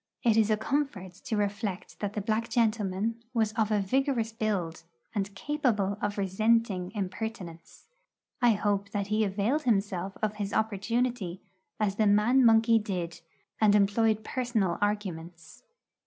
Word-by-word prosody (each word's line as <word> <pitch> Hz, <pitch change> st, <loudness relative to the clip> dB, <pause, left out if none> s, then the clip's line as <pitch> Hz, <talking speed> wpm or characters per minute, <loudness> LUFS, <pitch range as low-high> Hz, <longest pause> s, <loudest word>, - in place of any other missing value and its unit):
It 230 Hz, -3 st, +4 dB
is 220 Hz, -1 st, +3 dB
a 215 Hz, -, +3 dB
comfort 220 Hz, -6 st, -2 dB
to 220 Hz, -, -1 dB
reflect 205 Hz, -1 st, -3 dB
that 205 Hz, -1 st, -3 dB
the 210 Hz, -, -2 dB
black 220 Hz, +3 st, -1 dB
gentleman 220 Hz, -1 st, 0 dB
was 220 Hz, -2 st, +1 dB
of 220 Hz, -1 st, +1 dB
a 210 Hz, -1 st, +2 dB
vigorous 240 Hz, +2 st, 0 dB
build, 195 Hz, -7 st, -2 dB, 0.3 s
and 200 Hz, -1 st, -3 dB
capable 215 Hz, -7 st, 0 dB
of 205 Hz, 0 st, -2 dB
resenting 200 Hz, -1 st, +1 dB
impertinence. 185 Hz, -3 st, -6 dB, 0.6 s
I 240 Hz, -2 st, +5 dB
hope 200 Hz, -1 st, -1 dB
that 200 Hz, -1 st, -1 dB
he 215 Hz, +1 st, +3 dB
availed 210 Hz, +9 st, 0 dB
himself 195 Hz, -6 st, -1 dB
of 210 Hz, 0 st, -1 dB
his 200 Hz, -1 st, -3 dB
opportunity, 220 Hz, -2 st, -1 dB, 0.4 s
as 205 Hz, -2 st, 0 dB
the 215 Hz, -, +3 dB
man 215 Hz, +6 st, +4 dB
monkey 225 Hz, 0 st, +5 dB
did, 180 Hz, -5 st, -4 dB, 0.4 s
and 210 Hz, -1 st, +5 dB
employed 215 Hz, +2 st, +2 dB
personal 225 Hz, -8 st, -1 dB
arguments. 175 Hz, -, -4 dB
210 Hz, 140 wpm, -28 LUFS, 195-225 Hz, 0.6 s, I